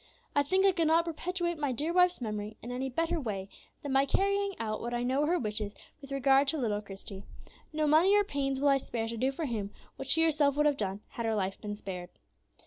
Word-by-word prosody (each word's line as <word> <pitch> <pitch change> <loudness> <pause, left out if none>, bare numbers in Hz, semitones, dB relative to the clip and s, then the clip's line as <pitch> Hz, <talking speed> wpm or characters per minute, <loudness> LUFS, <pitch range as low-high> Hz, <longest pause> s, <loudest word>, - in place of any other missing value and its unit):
"I 285 - +5
think 375 +7 +2
I 390 - +6
could 335 -4 +1
not 330 +2 +4
perpetuate 345 0 -2
my 290 -3 0
dear 300 +7 -1
wife's 360 -4 +4
memory 210 -2 -4
in 240 - -6
any 260 +2 -2
better 330 +5 0
way 200 -6 -4 0.3
than 285 -2 -3
by 270 +1 +4
carrying 400 +3 +1
out 215 -1 -3
what 240 +1 -3
I 240 - -1
know 260 +3 +1
were 300 - +2
her 350 +2 +2
wishes 210 -5 -3 0.3
with 275 -1 -11
regard 275 0 +4
to 315 - +1
little 215 -6 -1
Christie. 195 -1 -9 0.5
No 310 -1 0
money 325 +7 +5
or 410 - +4
pains 275 -7 -2
will 285 +1 +3
I 275 0 +4
spare 230 -3 -3
to 230 - -4
do 255 +4 +1
for 310 +4 -4
him 215 -6 -3 0.3
what 270 - -6
she 325 +3 +5
herself 295 -3 +3
would 300 +1 +2
have 290 -2 +3
done, 200 -2 -3
had 235 -1 -4
her 220 - +1
life 195 -2 -2
been 205 -1 -4
spared. 180 -4 -6
275 Hz, 240 wpm, -30 LUFS, 220-320 Hz, 0.5 s, I